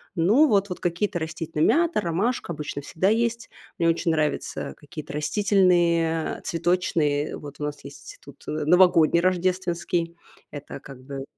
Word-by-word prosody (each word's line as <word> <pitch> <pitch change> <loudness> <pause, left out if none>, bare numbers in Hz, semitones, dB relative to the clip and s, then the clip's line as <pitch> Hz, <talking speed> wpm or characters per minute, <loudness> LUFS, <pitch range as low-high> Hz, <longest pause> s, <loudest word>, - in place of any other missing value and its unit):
Ну 210 - +4
вот. 200 -2 +2
Вот 180 - -5
какие-то 175 +2 -1
растительные: 160 -1 -2
мята, 330 0 +2
ромашка 185 +4 -1
обычно 145 -1 -5
всегда 165 +6 -1
есть. 235 +1 0 0.3
Мне 165 - +2
очень 165 0 +1
нравятся 150 - -2
какие-то 155 0 -9
растительные, 170 -1 +2
а, - - -14
цветочные. 165 -4 0
Вот 145 -1 -11
у - - -2
нас 150 0 -5
есть 140 - -11
тут, 140 0 -15
э, - - -3
новогодний, 170 -1 +5
рождественский. 175 -2 -1 0.4
Это 145 -1 -8
как 135 -2 -12
бы 135 0 -6
170 Hz, 150 wpm, -24 LUFS, 150-185 Hz, 0.4 s, новогодний